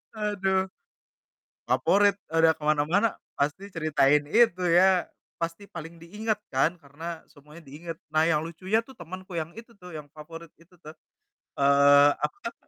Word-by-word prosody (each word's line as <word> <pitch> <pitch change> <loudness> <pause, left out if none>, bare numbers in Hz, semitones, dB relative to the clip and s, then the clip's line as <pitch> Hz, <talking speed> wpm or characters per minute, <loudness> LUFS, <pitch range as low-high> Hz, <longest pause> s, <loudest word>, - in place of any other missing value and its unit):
Aduh. 195 -3 -1 0.9
Favorit, 205 0 +2
udah 165 0 +4
ke 155 - -8
mana-mana, 165 +9 +2 0.2
pasti 185 +8 -2
ceritain 150 -3 +2
itu 215 -1 +3
ya, 180 +1 +4 0.3
pasti 165 +4 -4
paling 165 0 -8
diingat 210 +4 -3
kan, 140 +6 +1
karena 160 +3 -8
semuanya 150 +3 -16
diingat. 160 +4 -8 0.2
Nah, 155 +1 +3
yang 155 -2 +1
lucunya 185 +7 -1
tuh 265 - -15
temenku 185 +3 -9
yang 160 +1 -7
itu 230 +1 -12
tuh, 180 -3 -11
yang 150 -1 -8
favorit 165 +2 -11
itu 170 +2 -22
tuh. 155 - -9 0.6
Eee, 140 +1 +6
aku 150 0 -3
kan 230 - -5
165 Hz, 145 wpm, -26 LUFS, 150-190 Hz, 0.9 s, Eee